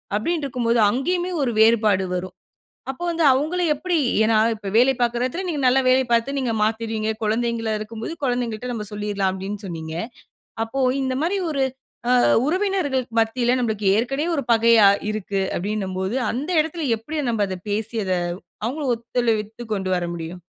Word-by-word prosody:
அப்பிடின்டு 300 +8 -1
இருக்கும்போது 235 -2 0
அங்கேயுமே 355 +8 -1
1 245 - 0
வேறுபாடு 215 -4 +4
வரும். 180 0 -5 0.6
அப்போ 270 - -9
வந்து 335 -1 0
அவுங்கள 310 +7 0
எப்பிடி 345 +3 -1 0.3
ஏன்னா, 220 0 +3 0.2
இப்ப 205 -2 -9
வேலை 255 +3 +5
பாக்குற 240 0 +1
இடத்துல 345 +9 -3
நீங்க 300 -5 -2
நல்ல 255 +1 +5
வேலை 260 +1 +5
பாத்து 235 +4 +2
நீங்க 250 -4 -1
மாத்தீருவீங்க. 220 0 -1
குழந்தைங்களா 225 0 0
இருக்கும்போது 220 +6 -6
குழந்தைங்கள் 245 -3 -1
கிட்ட 250 0 -5
நம்ப 210 -2 -4
சொல்லிர்லாம். 205 -2 -1
அப்பிடின்னு 195 +2 -6
சொன்னீங்க, 160 -3 -6 0.7
அப்போ 225 +4 -4 0.2
இந்த 260 -1 -1
மாரி 385 +4 0
1 275 -3 0 0.5
அ - - +5 0.3
உறவினர்கள்க்கு 305 - 0
மத்தியில 240 +2 +1
நம்பளுக்கு 215 -4 -1
ஏற்கனவே 270 +7 -1
1 280 - -1
பகையாக 225 -3 +5
இருக்கு. 200 -2 -2 0.2
அப்பிடின்னம்போது 190 +1 -2 0.2
அந்த 275 +9 -4
இடத்துல 320 -1 -3
எப்பிடி 300 +8 -5
நம்ப 215 -2 +1
அத 185 - -4
பேசி 220 +2 -3
அத 185 - 0 0.5
அவங்களும் 265 +1 -1
ஒத்துழைவித்து 230 -1 -2
கொண்டு 190 -1 -2
வர 175 - -2
முடியும்? 170 +1 -7
230 Hz, 160 wpm, -22 LUFS, 210-270 Hz, 0.7 s, வேலை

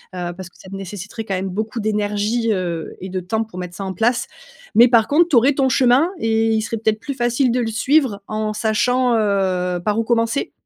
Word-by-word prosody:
heu, 175 -1 -4
parce 185 -1 -9
que - - -26
ça 190 - -14
te - - -6
nécessiterait 195 +3 -7
quand 195 -3 -3
même 190 +1 -3
beaucoup 215 +5 -4
d'énergie, 210 +2 0
heu 175 -5 -3
et 190 - -7
de 185 0 -3
temps 220 +5 -2
pour 215 -5 -10
mettre 180 -1 -7
ça 195 - -6
en 190 - -4
place, 235 +4 +1 0.5
mais 235 +3 +7
par 230 -3 +4
contre, 330 +4 +4
tu 300 - +2
aurais 255 +5 +5
ton 270 -1 +1
chemin 260 +5 +4
et 225 -2 +1
il 220 -1 +1
serait 230 - -3
peut-être 220 0 0
plus 280 - -5
facile 240 +1 +1
de 250 - 0
le 235 - -1
suivre 225 -1 +1
en 215 0 -2
sachant, 245 +4 +1
heu, 190 -4 0
par 210 +1 +1
où - - +1
commencer? 230 +3 0
220 Hz, 230 wpm, -20 LUFS, 195-240 Hz, 0.5 s, mais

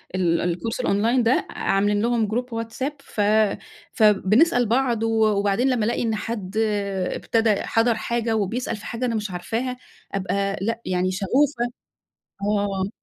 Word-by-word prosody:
ال 170 -2 +1
الكورس 175 +7 -2
الأونلاين 235 +2 +2
ده، 235 +3 +2
عاملين 205 +1 +1
لهم 230 -2 +1
Group 245 +3 -1 0.2
WhatsApp 260 +6 -4
ف 220 -6 -5 0.7
فبنسأل 220 - +4
بعض 235 -1 +1
و 225 -1 +2
وبعدين 205 +4 +2
لمّا 235 -4 +1
ألاقي 235 - 0
إن 225 -1 0
حد 215 -2 -5 0.5
ابتدا 225 -3 +1
حَضَر 230 0 +2
حاجة 230 -1 -1
وبيسأل 220 +4 -1
في 215 - -12
حاجة 245 +1 -3
أنا 230 -2 -1
مش 210 -3 -3
عارفاها، 230 +8 -3 0.3
أبقى 195 0 -1
لأ، 230 +3 -2
يعني 185 0 0
شغوفة 240 +6 +1 0.8
آه. 200 -2 0
220 Hz, 145 wpm, -23 LUFS, 200-235 Hz, 0.8 s, فبنسأل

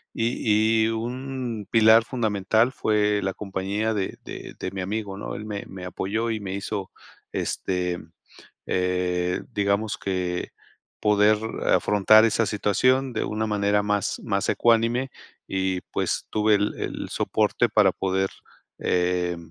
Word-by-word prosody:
Y 110 -1 +2
y - - +2
un 120 -1 -4
pilar 110 0 +6
fundamental 110 -1 +1
fue 105 -4 +1
la 95 0 -1
compañía 100 +2 -2
de 100 -2 -3
de - - -8
de - - -4
mi 95 -1 -4
amigo, 100 +1 -3
¿no? - - -5
Él 105 - -6
me 105 -2 -5
me 95 -1 -8
apoyó 110 +5 -2
y 110 - -2
me 95 -2 -5
hizo 100 -1 -4 0.4
este, 90 -1 -2 0.7
eh, 90 0 0
digamos 100 0 0
que, 90 -2 -2 0.5
poder 105 0 +4 0.3
afrontar 110 +2 +5
esa 115 +1 +2
situación 130 +6 +2
de - - -1
una 110 +1 -2
manera 105 0 +2
más, 105 -1 -1
más 100 -3 -1
ecuánime 120 +3 +2 0.4
y, 95 -1 -1
pues, - - -1
tuve 105 0 +3
el 105 +1 -1
el - - -4
soporte - - +1
para - - +5
poder, 95 0 -1 0.5
eh, 90 -1 0
105 Hz, 135 wpm, -25 LUFS, 95-110 Hz, 0.7 s, pilar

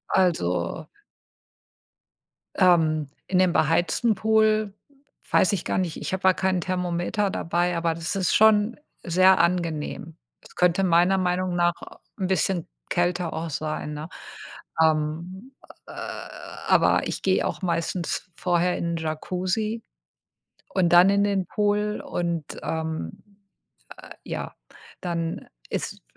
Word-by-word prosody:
Also 90 - 0 1.7
ähm, 155 -5 +3 0.2
in 185 -1 +2
dem 185 -2 +3
beheizten 170 +8 +2
Pool 215 0 +2 0.6
weiß 185 - +4
ich 185 - -2
gar - - -1
nicht. 175 -4 -1
Ich - - -4
habe 190 - -3
da 190 - +6
kein 185 -1 0
Thermometer 180 +3 -1
dabei, 175 -1 0
aber 165 -1 0
das 165 +3 -4
ist 190 -2 +1
schon 220 +2 +4 0.2
sehr 185 +2 +5
angenehm. 165 -2 -1 0.3
Es - - -18
könnte 180 +1 +3
meiner 180 +2 +4
Meinung 180 0 0
nach 175 -1 +3 0.5
'n 190 - 0
bisschen 185 -1 0 0.2
kälter 175 -1 0
auch 160 +1 -4
sein, 155 0 -3
ne? 150 +3 -6 0.7
Ähm, 160 - -1 0.3
äh, - - -10 0.8
aber - - +4
ich - - -4
gehe - - +2
auch - - -5
meistens 170 0 -2
vorher 180 0 +1
in 170 0 -2
Jacuzzi 185 +8 -2 0.9
und 185 -3 +3
dann 175 +2 +8
in 200 0 +3
den 195 -3 0
Pool 210 0 0
und, 170 -3 -2 0.2
ähm, 160 - -4 0.8
äh, - - -13
ja, - - -5 0.5
dann 170 -2 -3 0.2
ist, - - -4
180 Hz, 125 wpm, -25 LUFS, 165-190 Hz, 1.7 s, dann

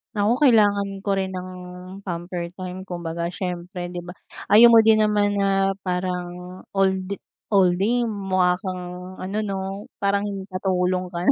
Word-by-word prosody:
Ako, 215 +5 +2
kailangan 205 -7 +3
ko 200 - 0
rin 190 0 -3
ng 185 0 -5 0.6
pamper 175 -1 -4
time. 185 0 -7
Kumbaga, 170 -1 -3
siyempre, 175 0 -5
'di 180 - -5
ba, 175 +1 -9 0.4
ayaw 235 +3 +9
mo 230 - +8
din 220 -1 +5
naman 205 -1 +2
na 195 -1 +2
parang 180 0 -4
all 195 -1 +3
d 190 +1 -5 0.3
all 190 -3 +5
day 230 +7 +1
mukha 190 -4 +1
kang 180 0 -6
ano 195 +3 -4
'no? 195 -2 -3 0.4
Parang 200 0 +1 0.2
katulong 185 -1 0
ka 170 - -4
na. - - +8
190 Hz, 155 wpm, -23 LUFS, 180-200 Hz, 0.6 s, ayaw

